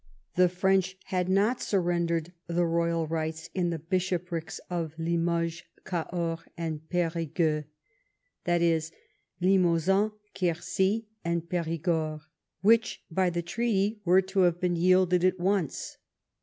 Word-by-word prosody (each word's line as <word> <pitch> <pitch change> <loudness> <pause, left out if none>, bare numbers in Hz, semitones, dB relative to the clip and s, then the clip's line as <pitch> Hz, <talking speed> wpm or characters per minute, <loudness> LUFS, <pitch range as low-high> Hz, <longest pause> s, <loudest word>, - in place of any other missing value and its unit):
Tlie 180 -1 +5
French 190 +1 +1
had 180 -1 -1
not 210 +6 +2
surrendered 170 -3 0
the 170 +1 +1
royal 170 0 +1
rights 160 0 -3
in 180 -2 0
the 170 - -2
bishoprics 175 0 -2
of 165 -3 -3
Limoges, 170 0 0 0.2
Cahors, 170 -2 -2 0.2
and 160 -2 -3
Perigueux 165 -3 0 0.8
(i.e. 175 0 +3
the 160 -1 0 0.5
Limousin, 185 +2 +3 0.2
Quercy, 185 +5 0 0.2
and 170 0 -1
Perigord), 165 -2 -1 0.4
which 225 +3 +3
by 185 +2 +2
the 175 0 -2
treaty 210 +2 0
were 185 +1 +5
to 190 +1 -2
have 175 -2 +4
been 180 -1 +1
yielded 180 0 +4
at 185 0 +2
once. 185 -4 -1
175 Hz, 120 wpm, -28 LUFS, 165-185 Hz, 0.8 s, Tlie